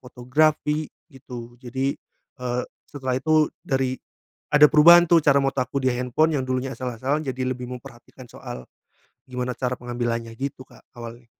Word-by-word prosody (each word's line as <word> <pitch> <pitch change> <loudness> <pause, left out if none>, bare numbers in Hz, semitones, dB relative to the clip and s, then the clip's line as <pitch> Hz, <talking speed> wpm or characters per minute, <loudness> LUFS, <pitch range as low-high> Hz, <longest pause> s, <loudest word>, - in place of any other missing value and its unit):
fotografi, 150 +4 0 0.2
gitu. 120 -2 -10
Jadi, 130 +2 -2 0.5
eee, 125 0 -1 0.3
setelah 130 -3 -3
itu 155 +2 +3
dari 130 -2 -1 0.6
ada 150 0 +8
perubahan 170 +3 +8
tuh 170 - +7
cara 140 -1 +5
foto 135 0 -1
aku 130 +2 -3
di 130 - +3
handphone 125 +6 +1
yang 130 - -1
dulunya 130 +1 -1
asal-asalan 130 +4 -2
jadi 130 0 -3
lebih 125 -1 -7
memperhatikan 125 0 -11
soal, 65 - -9 0.6
gimana 125 0 -3
cara 125 -1 -1
pengambilannya 120 -1 -3
gitu, 135 -1 -4
Kak, - - -20
awalnya. 120 0 -9
130 Hz, 145 wpm, -24 LUFS, 125-140 Hz, 0.6 s, ada